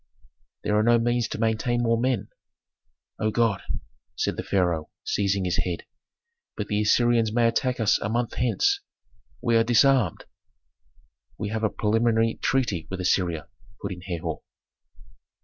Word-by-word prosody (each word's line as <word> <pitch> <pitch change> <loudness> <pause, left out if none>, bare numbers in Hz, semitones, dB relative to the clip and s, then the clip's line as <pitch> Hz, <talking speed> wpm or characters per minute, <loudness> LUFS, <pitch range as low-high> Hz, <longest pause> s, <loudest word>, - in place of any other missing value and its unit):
"There 105 - +1
are - - +4
no 120 +2 +5
means 120 0 +1
to - - -5
maintain 115 +2 0
more 115 0 +3
men." 125 -4 0 0.9
"O 110 - +1
God!" 110 -2 +1 0.5
said - - -1
the - - -3
Pharaoh, 85 -5 0
seizing 100 -2 0
his 90 - 0
head. 90 -2 -2 0.7
"But 105 -1 -4
the 105 0 +1
Assyrians 115 +1 +3
may 115 +1 +3
attack 125 +2 0
us 110 -2 +3
a 105 - -3
month 120 +1 -1
hence. 400 - +1 0.6
We 120 -2 +2
are 115 - +4
disarmed 120 - +3 0.6
" - - -38
"We 105 - -3
have 110 +1 -3
a 110 - +3
preliminary 115 +2 +1
treaty 105 -11 0
with 95 - -5
Assyria," 90 -3 0 0.3
put 100 - -5
in 90 -1 -7
Herhor. 90 -3 -4
110 Hz, 150 wpm, -25 LUFS, 95-120 Hz, 0.9 s, no